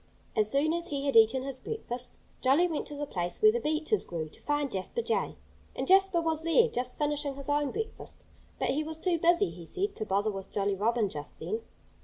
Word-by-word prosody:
As 215 -2 +3
soon 290 +6 +3
as 340 0 -1
he 280 -1 -2
had 275 - 0
eaten 225 +4 +6
his 270 -1 -5
breakfast, 250 - -6 0.2
Jolly 280 +7 +4
went 320 -4 -3
to 295 - -6
the 290 0 -3
place 175 -9 -3
where 430 0 +7
the 475 - -1
beeches 315 +3 0
grew, 160 -3 -5
to - - -13
find 290 -1 0
Jasper 195 - -3
Jay. - - 0 0.4
And - - -2
Jasper 385 -1 +5
was 320 -1 0
there, 335 +9 +4
just 250 0 -3
finishing 295 -1 -1
his 280 +1 -5
own 290 -1 +1
breakfast. 445 +5 -6 0.3
But - - 0
he 300 +3 +1
was 315 0 -5
too 340 0 0
busy, 345 +4 +3
he 175 - -10
said, 390 - -3
to 215 - -3
bother 205 +2 +1
with 195 -1 -7
Jolly 200 0 0
Robin 220 +2 +1
just 150 -5 -6
then. 445 +1 -3
290 Hz, 220 wpm, -30 LUFS, 225-340 Hz, 0.4 s, where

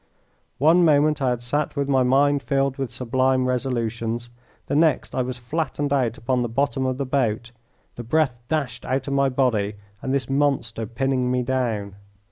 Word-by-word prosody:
One 165 +6 +5
moment 150 -1 +3
I 130 - +2
had 120 -1 -2
sat 145 +6 -1
with 140 -1 -1
my 135 -2 +3
mind 140 +3 +3
filled 135 -1 0
with 135 -3 -3
sublime 130 +1 +1
resolutions, 120 -2 -2 0.3
the - - -2
next 155 -1 +2
I 130 - 0
was 125 0 -3
flattened 145 +2 -2
out 125 -5 +1
upon 125 +2 0
the 120 - -1
bottom 135 +2 0
of 130 -1 -1
the 140 - -2
boat, 120 -3 -1 0.5
the 120 - -5
breath 125 -1 0
dashed 150 -2 -2
out 135 +2 -2
of 140 - -1
my 140 0 +3
body, 115 -6 0 0.3
and 130 - -3
this 135 -3 0
monster 135 -6 0
pinning 130 +2 0
me 125 0 +1
down. 115 -6 -2
130 Hz, 180 wpm, -23 LUFS, 120-140 Hz, 0.5 s, One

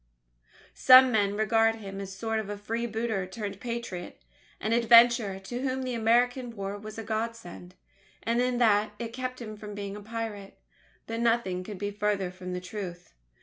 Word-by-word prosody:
Some 255 0 +8
men 205 -2 +1
regard 225 +1 +3
him 195 -3 -7
as 195 - -6
a 190 - -10
sort 225 0 -1
of 215 - -5
freebooter 225 -2 -2
turned 200 0 -6
Patriot 235 -7 -5 0.4
an 220 - -1
adventurer 235 -3 +6
to 240 +6 -5
whom 265 0 -1
the 255 -1 -3
American 240 +2 +1
War 200 -1 -4
was 215 +1 -9
a 225 - -5
God 225 +2 -2
send, 180 -4 -12 0.5
in 245 +2 +1
that 210 -3 +3
it 230 +1 -6
kept 255 0 -4
him 215 -3 -7
from 210 0 -9
being 200 -1 -5
a 210 - -8
pirate. 215 -2 -6 0.5
But 225 0 -4
nothing 230 -6 +1
could 205 +1 -7
be 205 +1 -3
farther 205 -3 -1
from 180 0 -7
the 180 - -2
truth. 180 -2 -7
220 Hz, 175 wpm, -28 LUFS, 200-235 Hz, 0.5 s, Some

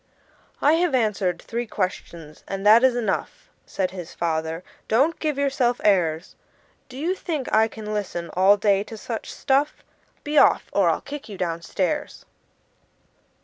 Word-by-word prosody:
"I 295 - +5
have 350 -6 +2
answered 200 -7 0
three 235 +1 -4
questions, 170 -6 -5
and 195 0 -5
that 220 +4 +7
is 260 -2 +4
enough," 245 - -3 0.2
Said 185 -2 -2
his 180 -3 -8
father; 160 0 -2 0.2
"don't 285 +9 +2
give 305 -3 -1
yourself 265 -3 +1
airs! 170 -5 +1 0.5
Do 255 - -10
you 330 +6 0
think 315 -8 -4
I 220 +1 +5
can 215 -1 -7
listen 180 -5 -4
all 190 +3 +5
day 200 -1 +2
to 225 - -9
such 225 +1 -6
stuff? 280 +3 0 0.4
Be 295 0 +3
off, - - +3
or - - +3
I'll - - 0
kick 285 -4 -8
you 200 - -8
down 170 -2 -2
stairs!" 245 - -3
215 Hz, 155 wpm, -23 LUFS, 185-270 Hz, 0.5 s, that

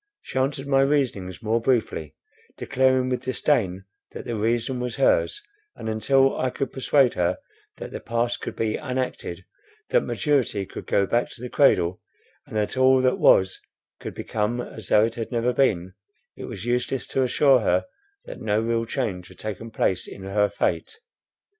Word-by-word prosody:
She 130 - -3
answered 135 +1 -1
my 135 -1 +3
reasonings 125 -9 0
more 115 +2 +1
briefly, 110 - 0 0.4
declaring 130 0 +2
with 125 - -1
disdain, 100 -8 0 0.3
that - - -7
the 120 -2 -3
reason 115 +4 0
was 125 0 -3
hers; - - +2 0.4
and, - - -7
until 135 +5 +3
I 130 - +1
could 130 +1 -3
persuade 135 -1 +3
her 90 0 0 0.4
that - - -7
the - - -5
past 120 +1 -1
could - - -5
be 110 -1 -1
unacted, 125 - -4 0.5
that - - +4
maturity 130 -9 0
could - - -9
go 100 - +2
back 120 +4 0
to 120 - -12
the 125 - -6
cradle, 90 - +3 0.5
and - - -10
that 105 +2 0
all 130 0 +5
that 130 0 +2
was 95 0 +4 0.4
could - - -7
become 110 +3 -2
as 110 -4 -7
though 105 +1 +5
it 115 - -3
had 115 +1 -5
never 120 +1 +1
been, 95 -9 +1 0.4
it - - -7
was - - -7
useless 125 +2 -1
to 135 - 0
assure 130 +1 +4
her 110 - +1 0.4
that - - -9
no 105 -1 +1
real 115 0 0
change 110 -8 -3
had - - -16
taken 110 +2 -6
place 95 -4 0
in 95 - -10
her 100 +1 +1
fate. 445 - -2
120 Hz, 175 wpm, -24 LUFS, 105-130 Hz, 0.5 s, all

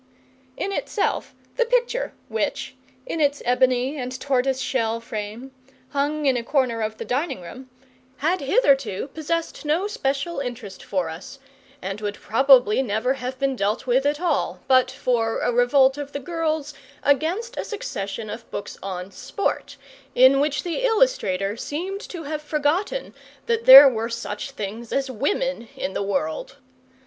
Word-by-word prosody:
In 395 - -2
itself 400 +1 -2 0.2
the - - +3
picture, - - 0 0.2
which - - -2 0.3
in 330 -10 -3
its 285 -1 +2
ebony 255 +3 +2
and 255 +1 -5
tortoise 265 -1 +1
shell 230 -4 -1
frame 225 +3 -6 0.4
hung 290 +2 -1
in 265 -2 +4
a 240 - 0
corner 245 -3 0
of 215 0 -3
the - - -6
dining 280 - -1
room, 250 +10 -10 0.5
had 340 +6 0
hitherto 275 - +2
possessed 325 +1 -3
no 310 +6 +1
special 280 -4 -2
interest 240 -7 -6
for 185 -4 -1
us, 165 +11 -9 0.5
and 195 +2 -4
would 205 -1 -3
probably 245 0 +4
never 235 +1 0
have 260 -1 -5
been 270 0 0
dealt 210 +3 -1
with 260 +3 +2
at 295 +1 0
all 350 0 -1
but 255 -1 +5
for 230 -3 0
a - - +1
revolt 265 +3 +4
of 285 -1 -6
the 285 - -3
girls 315 -1 -2 0.3
against 350 - +1
a - - -3
succession 215 - -5
of 225 +3 -8
books - - -6
on 185 -1 -5
sport, 400 - -3 0.4
in 260 +2 +6
which 290 0 0
the 350 +7 -2
illustrator 445 - +2
seemed 365 - -4
to 345 -3 -7
have 305 +1 -4
forgotten 305 +11 -1 0.3
that 465 -1 0
there 275 +2 +12
were 230 -3 0
such 230 0 -5
things 220 -2 -6
as 270 -1 -1
women 285 - -1
in 190 - -3
the - - -2
world. 195 - -2
270 Hz, 155 wpm, -23 LUFS, 230-310 Hz, 0.5 s, there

